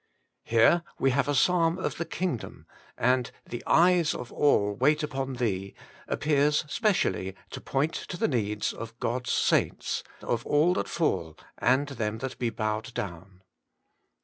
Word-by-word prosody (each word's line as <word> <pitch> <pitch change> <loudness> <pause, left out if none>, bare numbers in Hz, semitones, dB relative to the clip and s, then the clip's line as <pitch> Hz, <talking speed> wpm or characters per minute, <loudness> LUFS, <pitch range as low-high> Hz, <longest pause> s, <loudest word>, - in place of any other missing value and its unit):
Here 115 +9 +4 0.2
we 135 - +2
have 140 +3 +1
a 145 - +1
Psalm 170 +4 +3
of - - -3
the 170 - -1
Kingdom, 175 -11 -4 0.3
and 125 0 +2
* - - -40
The 120 - -4
eyes 170 -1 +4
of 125 - -7
all 105 -8 +3
wait 150 +8 +2
upon 135 -2 -3
Thee 100 -6 -2 0.2
' - - -23
appears 150 0 +2
specially 165 - 0 0.2
to 130 - -7
point 145 +4 0 0.2
to 180 - -4
the - - +1
needs 105 -5 -1
of 115 +1 -9
God's 125 +2 -2
saints, - - +1 0.2
of 120 -1 -1
all 155 +5 +3
that - - -2
fall 80 - -1 0.2
and 130 +6 +3
them 110 -5 -3
that 130 +2 -6
be 120 - 0
bowed 110 +2 -3
down. 95 0 -6
130 Hz, 160 wpm, -28 LUFS, 110-150 Hz, 0.3 s, Here